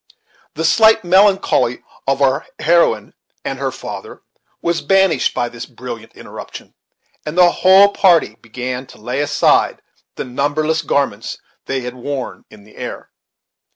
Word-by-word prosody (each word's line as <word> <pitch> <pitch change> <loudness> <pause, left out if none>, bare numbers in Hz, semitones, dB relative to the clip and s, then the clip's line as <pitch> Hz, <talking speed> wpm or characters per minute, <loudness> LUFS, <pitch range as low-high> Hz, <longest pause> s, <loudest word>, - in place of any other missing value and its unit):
The 160 +2 -2
slight 220 +5 +5
melancholy 190 - +3 0.2
of 135 +1 +1
our 135 +3 +1
heroine 150 -11 +2 0.3
and - - -4
her - - -1
father - - -9 0.4
was 170 0 -1
banished 190 -7 +2
by 120 - 0
this 120 -1 -8
brilliant 115 -2 -9
interruption; - - -10 0.5
and 155 +3 -6
the 175 -1 +6
whole 190 +3 +6
party 170 - +3
began 125 +2 -5
to - - -15
lay 125 +5 -4
aside 145 0 +2 0.3
the - - -5
numberless 145 +5 -1
garments 140 -8 -1 0.3
they 135 -1 -2
had 125 0 -6
worn 130 +1 -6
in 105 -1 -16
the 105 - -20
air. - - -7
140 Hz, 140 wpm, -18 LUFS, 125-170 Hz, 0.5 s, the